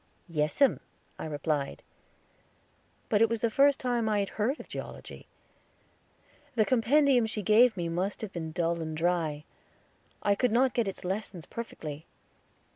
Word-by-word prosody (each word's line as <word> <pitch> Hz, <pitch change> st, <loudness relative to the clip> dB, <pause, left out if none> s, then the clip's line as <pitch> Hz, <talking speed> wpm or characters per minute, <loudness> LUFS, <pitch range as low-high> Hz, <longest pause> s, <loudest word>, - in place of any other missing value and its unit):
"Yes 150 Hz, -3 st, -1 dB
'em," 275 Hz, -, +4 dB, 0.4 s
I -, -, -4 dB
replied; 145 Hz, -1 st, -2 dB, 1.2 s
but 210 Hz, -1 st, +2 dB
it 225 Hz, -, +5 dB
was 230 Hz, -1 st, -2 dB
the 230 Hz, -, +1 dB
first 280 Hz, +3 st, +4 dB
time 245 Hz, -2 st, 0 dB
that 215 Hz, -, +1 dB
I 205 Hz, -, +2 dB
had 195 Hz, -, -2 dB
heard 235 Hz, +8 st, -1 dB
of -, -, -10 dB
Geology. -, -, -8 dB, 1.3 s
The 220 Hz, -2 st, +3 dB
compendium 255 Hz, 0 st, +3 dB
she 215 Hz, -1 st, -4 dB
gave 220 Hz, +2 st, +5 dB
me 170 Hz, -1 st, -2 dB
must 180 Hz, +4 st, -2 dB
have 210 Hz, -3 st, -6 dB
been 160 Hz, -2 st, -4 dB
dull 170 Hz, 0 st, -1 dB
and 155 Hz, -1 st, -4 dB
dry. 160 Hz, -3 st, 0 dB, 0.8 s
I 205 Hz, -, +4 dB
could 245 Hz, +3 st, +1 dB
not 250 Hz, +1 st, +3 dB
get 235 Hz, -4 st, +1 dB
its 195 Hz, -, -6 dB
lessons 190 Hz, -3 st, -4 dB
perfectly. 155 Hz, -10 st, -7 dB
205 Hz, 160 wpm, -29 LUFS, 165-235 Hz, 1.3 s, it